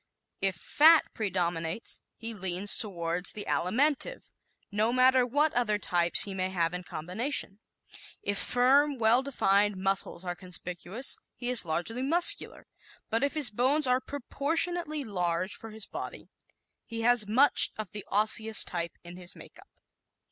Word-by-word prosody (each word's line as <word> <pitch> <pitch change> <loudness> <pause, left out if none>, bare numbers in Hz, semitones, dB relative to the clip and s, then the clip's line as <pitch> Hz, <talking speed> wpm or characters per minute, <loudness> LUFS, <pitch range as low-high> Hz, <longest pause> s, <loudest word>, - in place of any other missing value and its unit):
If 195 -2 0
fat 315 - +4
predominates 175 -2 -3 0.2
he 230 +1 -6
leans 190 0 +1
toward 175 -3 -1
the 210 - -1
Alimentive, 285 - -1 0.4
no 215 +3 0
matter 255 0 +3
what 290 +5 +1
other 225 -4 0
types 175 -4 +2
he 200 - -5
may 185 -1 -2
have 170 -2 -1
in 180 - -4
combination; 195 - -4 0.6
if 200 -1 -2
firm, 275 +3 +2
well 230 +2 +3
defined 205 -7 +1
muscles 190 -1 -1
are 175 - -3
conspicuous, 180 - -1 0.2
he 245 0 -4
is 240 -6 +6
largely 175 +10 -3
Muscular; 335 +6 +4 0.5
but 225 +4 0
if 280 - -1
his 290 -7 +2
bones 265 +7 +2
are 255 0 +2
proportionately 310 +4 -2
large 180 -3 -2
for 225 - -9
his 215 -2 -7
body - - -8 0.6
he 230 0 -6
has 235 -2 +2
much 260 +7 +4
of 215 -3 -6
the 210 -1 -7
Osseous 220 +1 +2
type 170 -1 -5
in 175 +1 -11
his 180 -1 -6
makeup. - - -16
215 Hz, 145 wpm, -28 LUFS, 185-255 Hz, 0.6 s, is